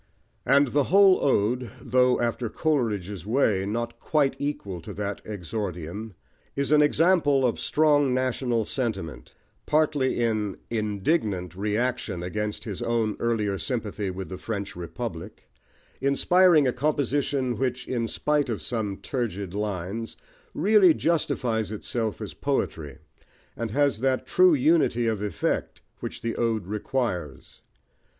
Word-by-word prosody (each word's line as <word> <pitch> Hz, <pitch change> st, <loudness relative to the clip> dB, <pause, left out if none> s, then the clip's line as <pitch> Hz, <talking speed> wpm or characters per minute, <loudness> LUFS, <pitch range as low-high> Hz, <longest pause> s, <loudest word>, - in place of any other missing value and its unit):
And 140 Hz, +1 st, +5 dB
the 145 Hz, +1 st, +2 dB
whole 195 Hz, 0 st, +5 dB
ode, 125 Hz, -1 st, +1 dB
though, 125 Hz, +1 st, +2 dB
after 120 Hz, 0 st, -1 dB
Coleridge's 105 Hz, -, -1 dB
way, 105 Hz, -4 st, +1 dB
not 115 Hz, +2 st, -3 dB
quite 145 Hz, -3 st, +1 dB
equal 100 Hz, -, -4 dB
to -, -, -9 dB
that 100 Hz, 0 st, -4 dB
exordium, 100 Hz, 0 st, -5 dB, 0.4 s
is 140 Hz, +1 st, -1 dB
an 150 Hz, 0 st, +6 dB
example 150 Hz, -3 st, +3 dB
of 120 Hz, -, 0 dB
strong 145 Hz, -3 st, +3 dB
national 125 Hz, -2 st, 0 dB
sentiment, 110 Hz, -, -4 dB, 0.3 s
partly 150 Hz, -4 st, +2 dB
in 110 Hz, -4 st, 0 dB
indignant 105 Hz, -, -1 dB
reaction 105 Hz, -2 st, -1 dB
against 105 Hz, +4 st, -3 dB
his 105 Hz, -5 st, -6 dB
own 115 Hz, -2 st, 0 dB
earlier 105 Hz, -4 st, 0 dB
sympathy 105 Hz, -5 st, -3 dB
with 95 Hz, 0 st, -6 dB
the 95 Hz, -, -7 dB
French 100 Hz, -3 st, -4 dB
Republic, 90 Hz, +2 st, -7 dB, 0.5 s
inspiring 155 Hz, +3 st, +4 dB
a 125 Hz, -, +1 dB
composition 140 Hz, -2 st, 0 dB
which, 130 Hz, -1 st, -2 dB
in 120 Hz, -3 st, -1 dB
spite 150 Hz, +2 st, 0 dB
of 110 Hz, -, -3 dB
some 110 Hz, -5 st, -2 dB
turgid 100 Hz, -8 st, -4 dB
lines, 105 Hz, +2 st, -4 dB, 0.4 s
really 190 Hz, 0 st, +5 dB
justifies 125 Hz, -, 0 dB
itself 110 Hz, 0 st, -3 dB
as 105 Hz, -, -7 dB
poetry, 80 Hz, -, -2 dB, 0.6 s
and 115 Hz, -1 st, -3 dB
has 140 Hz, 0 st, +1 dB
that 130 Hz, +1 st, 0 dB
true 365 Hz, -3 st, +5 dB
unity 280 Hz, -, +3 dB
of 110 Hz, -3 st, 0 dB
effect 105 Hz, -6 st, -2 dB, 0.2 s
which -, -, -6 dB
the 115 Hz, 0 st, -2 dB
ode 115 Hz, -4 st, 0 dB
requires. 105 Hz, -, -3 dB
115 Hz, 130 wpm, -26 LUFS, 105-140 Hz, 0.6 s, an